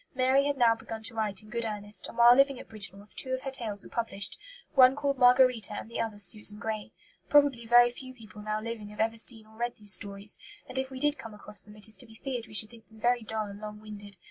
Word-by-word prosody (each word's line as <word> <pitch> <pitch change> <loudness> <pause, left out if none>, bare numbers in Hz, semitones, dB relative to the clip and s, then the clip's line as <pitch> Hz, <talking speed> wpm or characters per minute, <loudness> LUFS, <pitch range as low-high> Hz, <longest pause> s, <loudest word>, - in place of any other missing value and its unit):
Mary 260 +2 +3
had 285 -1 -1
now 235 -3 +5
begun 225 0 -8
to 230 - -3
write 215 -3 -2
in 215 - -15
good 235 -1 -1
earnest; 210 -1 -2
and - - -11
while 240 +1 +8
living 275 -1 +4
at - - -11
Bridgnorth 205 -1 -8
two 260 - -3
of 260 - -2
her 270 - -3
tales 215 -6 -4
were - - -12
published, 220 -4 -2 0.4
one 260 -1 +7
called 280 -2 -1
Margarita 250 -4 +5
and 225 - -7
the - - -2
other 220 -2 -3
Susan 210 0 -1
Grey. 220 -1 -4 0.4
Probably 285 -6 +4
very 240 +1 +7
few 255 +1 -10
people 215 -3 -12
now 215 0 -2
living 220 -2 -6
have 210 - -13
ever 225 +1 +1
seen 225 -1 0
or 220 0 -19
read 240 0 -1
these 205 -2 -1
stories; 200 +2 -4 0.3
and 260 +1 -3
if 265 0 -2
we 260 -1 -7
did 295 +1 +1
come 225 -2 -9
across 210 0 -3
them 210 0 -15
it 210 +1 -5
is 220 - -6
to - - -12
be 225 - -15
feared 245 -1 -5
we 215 - -6
should 215 +1 +6
think 230 -2 -16
them 220 0 -17
very 240 +2 +2
dull 220 -1 -2
and 200 0 -9
long 210 0 -7
winded. 205 -2 -11
225 Hz, 260 wpm, -29 LUFS, 210-250 Hz, 0.4 s, while